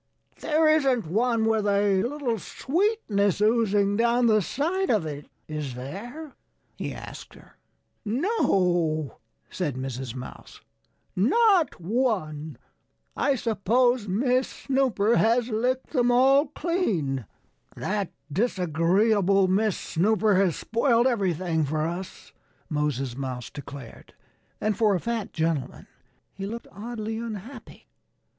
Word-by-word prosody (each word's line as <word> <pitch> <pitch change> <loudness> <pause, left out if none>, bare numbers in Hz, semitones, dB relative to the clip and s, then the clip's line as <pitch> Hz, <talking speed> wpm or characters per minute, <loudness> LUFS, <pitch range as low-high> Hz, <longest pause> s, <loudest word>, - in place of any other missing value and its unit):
"There 315 +1 +2
isn't 270 - +3
one 225 +6 +1
with 220 -2 +1
a 200 -1 +3
little 245 -3 -2
sweetness 265 - 0
oozing 210 -2 +2
down 235 +1 +3
the 215 -2 +4
side 345 - -1
of 210 -8 +2
it, 145 -1 -6 0.2
is 150 -5 -5
there?" 240 - -8 0.4
he - - -4
asked - - -10
her. - - -18 0.5
"No!" 180 - 0 0.3
said 160 -8 -2
Mrs. 130 -1 -5
Mouse. 125 - -10 0.6
"Not 360 - +3
one! 165 - -1 0.6
I 280 - +2
suppose 235 +1 +1
Miss 250 +6 +1
Snooper 250 -5 +1
has 230 +2 +2
licked 250 +4 -1
them 245 -1 +2
all 270 +4 +5
clean." 205 - -1 0.5
"That 200 -2 -2 0.2
disagreeable 190 +1 +2
Miss 200 +2 +1
Snooper 210 +4 +1
has 185 -3 +3
spoiled 235 +1 +2
everything 180 -9 +1
for 155 +2 -1
us," 175 +3 -6 0.4
Moses 140 -4 -1
Mouse 130 -3 -5
declared. 140 -4 -10 0.4
And 215 -1 0
for 210 -2 +3
a - - 0
fat 230 0 -3
gentleman 160 -5 -2 0.5
he 195 0 -5
looked 230 +3 -6
oddly 220 +1 -5
unhappy. 230 +2 -8
210 Hz, 115 wpm, -26 LUFS, 170-245 Hz, 0.6 s, all